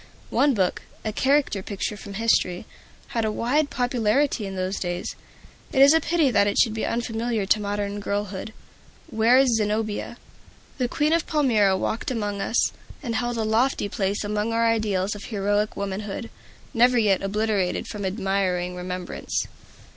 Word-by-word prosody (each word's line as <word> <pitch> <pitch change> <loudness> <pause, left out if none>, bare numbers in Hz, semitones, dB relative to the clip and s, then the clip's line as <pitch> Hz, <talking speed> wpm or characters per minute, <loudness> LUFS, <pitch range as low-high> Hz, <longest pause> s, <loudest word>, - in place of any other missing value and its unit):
One 280 -3 +3
book, 185 -3 0 0.2
a 215 - -2
character 270 -5 +2
picture 200 +2 -4
from 200 -1 -9
history, 195 -5 +1 0.4
had 230 - -1
a 215 - 0
wide 285 +7 +1
popularity 245 -1 +1
in 195 - -6
those 185 +1 -2
days. 175 -1 -3 0.6
It 265 - 0
is 280 +2 +8
a 320 - +5
pity 320 -4 +2
that 205 -3 +4
it 205 - 0
should 225 -4 +4
be 220 - -3
unfamiliar 230 -2 -1
to 210 +2 +3
modern 205 0 -3
girlhood, 205 0 -3 0.6
Ware's 240 +3 +4
"Zenobia." 215 0 -2 0.6
The 250 - +1
Queen 295 +5 +1
of 335 -1 +1
Palmyra 220 - +3
walked 220 +4 -2
among 205 -5 -2
us, 230 - +1 0.3
and 235 -4 -2
held 240 +1 -1
a 225 - 0
lofty 220 +1 +1
place 200 +1 -1
among 210 +2 -1
our 230 0 +2
ideals 210 -4 +1
of 205 - -8
heroic 205 0 -1
womanhood, 200 +3 -4 0.4
never 245 0 +4
yet 205 -5 +3
obliterated 200 -2 0
from 210 -2 -6
admiring 190 -2 -1
remembrance. 180 0 -3
215 Hz, 155 wpm, -24 LUFS, 200-240 Hz, 0.6 s, is